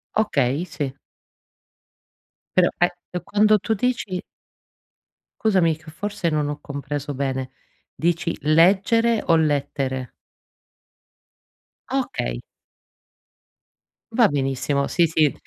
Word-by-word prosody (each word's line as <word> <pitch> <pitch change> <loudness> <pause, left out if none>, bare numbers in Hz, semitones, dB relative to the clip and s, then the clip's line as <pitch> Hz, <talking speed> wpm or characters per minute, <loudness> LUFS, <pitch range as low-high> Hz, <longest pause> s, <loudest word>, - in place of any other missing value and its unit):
Okay, 145 - +1
sì. 145 -5 -4 1.6
Però 180 -1 +6
ae 175 - +4 0.2
e 180 - -2
quando 210 +2 +4
tu 220 +3 -1
dici 210 -5 -1 1.2
scusami 185 -8 +3
che 160 0 -13
forse 200 +1 -2
non 150 -2 0
ho 145 0 -4
compreso 145 0 -5
bene, 130 -1 -2 0.4
dici 170 0 0
leggere 200 +9 +4
o 165 - +5
lettere? 140 -4 0 1.8
Okay. - - -2 1.7
Va 230 -1 +5
benissimo. 140 0 0
Sì, 170 -1 +3
sì, 155 -4 +2
160 Hz, 95 wpm, -23 LUFS, 140-190 Hz, 1.8 s, Però